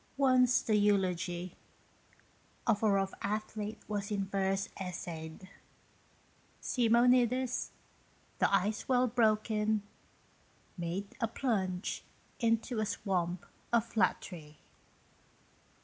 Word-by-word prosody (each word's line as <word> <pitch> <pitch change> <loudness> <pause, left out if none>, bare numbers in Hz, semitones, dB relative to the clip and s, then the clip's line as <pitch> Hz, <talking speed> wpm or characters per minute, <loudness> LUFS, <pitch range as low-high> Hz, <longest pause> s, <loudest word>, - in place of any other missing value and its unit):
Once, 255 -2 +4
the 220 -4 +2
eulogy 185 -3 +1 1.1
Of 220 -4 +2
a 220 - +4
rough 195 -1 +1
athlete 215 +1 -3
was 205 -1 -3
in 200 -2 -1
verse 195 0 0
essayed. 175 -2 -6 1.1
Simonides, 245 +1 +3 0.7
the - - +3
ice 205 +4 +1
well 250 -1 +4
broken, 215 -2 +2 0.9
made 180 +3 -4
A 230 - +2
plunge 195 -7 -1 0.4
into 230 0 +1
a 215 - +1
swamp 180 -2 -1 0.3
of 235 -1 +3
flattery. 170 -8 -1
210 Hz, 90 wpm, -32 LUFS, 190-230 Hz, 1.1 s, Once